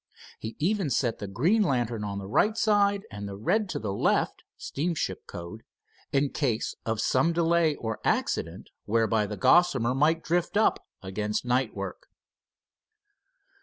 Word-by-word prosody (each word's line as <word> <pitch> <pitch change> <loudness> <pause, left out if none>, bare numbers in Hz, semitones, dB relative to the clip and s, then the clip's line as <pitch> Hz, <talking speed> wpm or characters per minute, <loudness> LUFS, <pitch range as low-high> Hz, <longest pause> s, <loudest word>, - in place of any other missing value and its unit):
He 110 +1 -6
even 185 0 0
set 120 -3 0
the 100 - -5
green 155 - +2
lantern 120 - 0
on 100 -1 -4
the 100 - -5
right 210 - +2
side 200 -2 +3
and 100 0 -6
the 100 - -6
red 205 - 0
to - - -3
the 105 -3 -3
left, - - +1 0.2
steamship 160 +1 -3
code, 85 +6 -8 0.5
in 140 +1 +2
case 120 -7 -1
of 110 -1 -1
some 160 +6 +2
delay 165 -2 +2
or 110 -4 -4
accident, - - -1
whereby 110 -1 +1
the 105 0 -5
Gossamer 135 - +4
might 155 +5 +2
drift 175 +4 0
up 220 - +2 0.2
against 105 +4 -2
night 125 -1 0
work. 100 -1 -6
125 Hz, 150 wpm, -27 LUFS, 105-170 Hz, 0.5 s, Gossamer